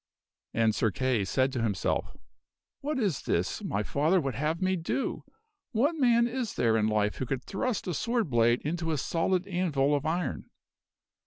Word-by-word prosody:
And 115 -1 +3
Sir 110 - +2
Kay 130 -2 0
said 130 +7 +1
to 120 - -1
himself, 105 -5 -1 0.3
" - - -63
What 295 +1 -2
is 200 - 0
this - - -1
my 100 +2 -1
father 155 - +2
would 135 -5 -2
have 150 +7 -1
me 185 0 +1
do! 175 +10 -2 0.5
What 270 +9 +2
man 240 -5 +4
is 240 -1 -3
there 115 -1 +2
in 110 -1 +2
life 105 -1 +1
who 130 - -3
could 130 0 -2
thrust 220 +3 -2
a 180 - -2
sword 230 +5 0
blade 120 0 +3
into 165 +2 -2
a 155 - 0
solid 170 +7 0
anvil 165 -7 +1
of 145 +1 0
iron?" 175 +3 -2
155 Hz, 180 wpm, -29 LUFS, 120-190 Hz, 0.5 s, man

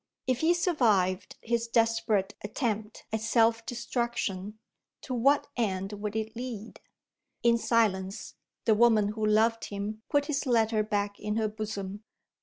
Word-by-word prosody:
If 255 -1 +1
he 335 +2 +3
survived 220 - +1
his 235 0 0
desperate 225 -3 +1
attempt 215 -1 -3
at 220 - 0
self 225 0 +3
destruction, 235 -5 -2 0.4
to 260 - -5
what 275 +4 +3
end 195 -4 -1
would 210 +1 -4
it 220 0 -3
lead? 230 -3 -7 0.6
In 235 0 +4
silence, 200 -4 0 0.3
the 225 - +5
woman 215 -2 +4
who 215 +1 -4
loved 220 +2 +3
him 205 +2 -5
put 285 0 +2
his 290 -1 -2
letter 225 -3 +3
back 205 -1 -2
in 210 0 -2
her 220 -1 +1
bosom. 210 -1 -5
220 Hz, 140 wpm, -29 LUFS, 210-235 Hz, 0.6 s, the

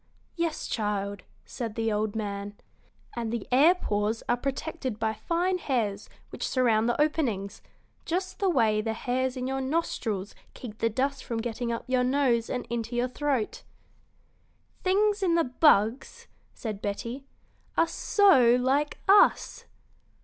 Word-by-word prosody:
"Yes, 335 -2 -2
child," 205 -2 -2 0.2
said 230 -3 -5
the 225 -1 0
old 210 0 -1
man, 205 -1 -4 0.6
"and 230 -2 -3
the 235 -3 -4
air 300 +8 +6
pores 210 - -1
are 240 - +3
protected 270 -1 -4
by 220 0 -1
fine 350 - -1
hairs 220 - -2 0.2
which - - -4
surround 235 -3 +2
the 240 - -1
openings, 260 -11 0 0.4
just 370 +2 -3
the 390 - +2
way 220 -9 +2
the 220 0 -2
hairs 255 +3 -2
in 255 - -3
your 265 +1 -2
nostrils 245 - -2 0.2
keep 225 -3 -9
the 230 - +2
dust 270 +5 -1
from 230 - -4
getting 235 +1 -3
up 230 - -3
your 255 -1 +1
nose 250 -3 +1
and 250 - -3
into 235 0 -4
your 245 +1 0
throat." 270 -4 -2 1.2
"Things 410 +2 +2
in 350 -3 +2
the 335 - +3
bugs," 250 -3 +2 0.3
said 215 -3 -6
Betty, 230 +6 -4 0.5
"are 330 - +4
so 270 - +4
like 270 +4 +1
us." 400 +1 +4
245 Hz, 145 wpm, -27 LUFS, 220-285 Hz, 1.2 s, air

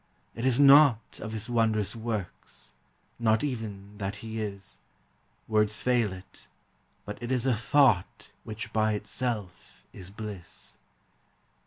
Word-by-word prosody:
It 115 +3 -2
is 130 0 +2
not 140 -5 +6
of 110 - -6
his 110 0 -4
wondrous 110 -3 +1
works, 105 - -6 0.5
Not 110 0 +2
even 105 -6 -5
that 100 0 -3
he 110 0 -4
is; 100 -3 -5 0.7
Words 105 -1 +2
fail 120 -5 +2
it, 95 0 -12 0.6
but 105 - -7
it 120 +1 -4
is 130 -1 +1
a 130 -3 +3
thought 120 -4 +2
Which 110 +2 -7
by 110 0 +2
itself 105 -3 -5
is 90 -1 -9
bliss. 100 -4 -6
110 Hz, 130 wpm, -28 LUFS, 100-120 Hz, 0.7 s, not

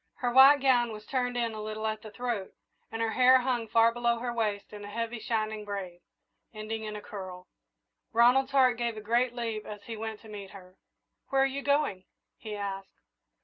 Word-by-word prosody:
Her 245 -2 -1
white 270 +2 +8
gown 245 -3 +3
was 215 0 -9
turned 245 -2 -1
in 230 -2 -1
a 215 - -6
little 215 0 -5
at 215 0 -2
the 215 - -9
throat, 230 -3 -4 0.4
and 225 0 -2
her 225 - 0
hair 255 +2 +6
hung 245 -3 -1
far 230 +1 +4
below 235 0 +1
her 240 +1 -3
waist 210 -3 -2
in 205 0 -8
a 205 - -8
heavy, 230 +2 -3
shining 220 -1 -2
braid, 190 -4 -6 0.5
ending 220 +1 -5
in 210 0 -5
a 210 - -7
curl. 185 -3 -8 0.7
Ronald's 245 +3 +4
heart 255 -3 +4
gave 235 -2 -1
a - - -6
great 235 +3 +1
leap 225 -3 -3
as 210 -1 -9
he 225 +2 -6
went 220 0 -5
to 225 - -14
meet 205 -2 -8
her. 185 -2 -14 0.5
"Where 270 -1 +3
are - - +4
you 270 +1 -3
going?" 280 -10 0 0.3
he 215 -2 -6
asked. 195 -1 -6
225 Hz, 205 wpm, -29 LUFS, 210-245 Hz, 0.7 s, white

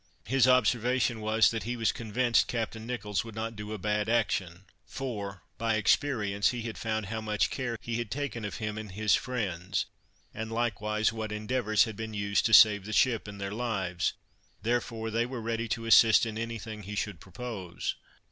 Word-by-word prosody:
His 130 +3 +3
observation 125 -1 +3
was, 110 +1 +4
that 110 -1 -2
he 120 +5 -3
was 115 -1 +2
convinced 115 +1 +1
Captain 115 -1 -3
Nicholls 105 -6 -2
would 115 -2 -10
not 115 +1 -4
do 105 0 -7
a 110 - -3
bad 105 +2 -1
action, 95 -6 0 0.2
for, 100 -8 -5 0.2
by 115 -1 +1
experience, 105 -3 +2
he 120 -2 -3
had 115 -1 -5
found 110 -1 -2
how 110 +3 -4
much 105 -1 0
care 120 -3 -3
he 115 -1 -3
had 120 -3 -3
taken 140 -3 -3
of 100 -4 -4
him 105 0 -3
and 105 -3 -8
his 105 +1 +2
friends, 100 -6 -1 0.5
and 110 +1 -5
likewise 110 -1 0
what 110 -1 -4
endeavors 110 0 +2
had 110 -2 -4
been 110 0 -5
used 100 +1 +1
to 110 - -2
save 105 -3 +7
the 110 - -5
ship 115 -2 +2
and 100 -1 -8
their 100 0 -4
lives; 100 -7 -1 0.5
therefore 115 -1 -1
they 115 +2 +1
were 125 -1 -5
ready 115 0 -2
to 115 +1 -3
assist 115 0 +7
in 110 -1 -4
any 115 +1 -3
thing 110 -1 -7
he 105 +1 -6
should 100 -4 -3
propose. 95 -2 -5
110 Hz, 190 wpm, -29 LUFS, 105-115 Hz, 0.5 s, save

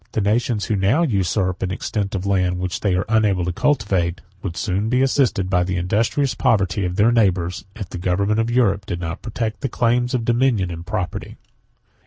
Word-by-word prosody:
The - - 0
nations 110 +1 +1
who 110 - 0
now 100 - +2
usurp 95 - 0
an 95 - -1
extent 100 +1 -3
of 95 0 -3
land 90 -2 +1
which 90 0 -3
they 100 -3 +1
are 90 - 0
unable 105 -5 +2
to 90 - -2
cultivate, 95 - 0 0.2
would 85 -4 -5
soon 100 +4 -1
be 125 +2 +3
assisted 130 -8 +1
by 90 -1 +2
the 90 +1 -2
industrious 110 +9 +1
poverty 100 -7 +1
of 90 0 -2
their 105 +4 +4
neighbors, 95 -4 +1
if 105 -5 -6
the 90 - -6
government 100 +4 +1
of 115 +1 +1
Europe 105 -5 +1
did 85 - -3
not 80 -1 -5
protect 115 -1 -4
the 135 - -1
claims 120 +2 +1
of 115 -2 -1
dominion 120 -6 +2
and 85 +1 -8
property. 90 0 -4
100 Hz, 200 wpm, -21 LUFS, 90-115 Hz, 0.2 s, their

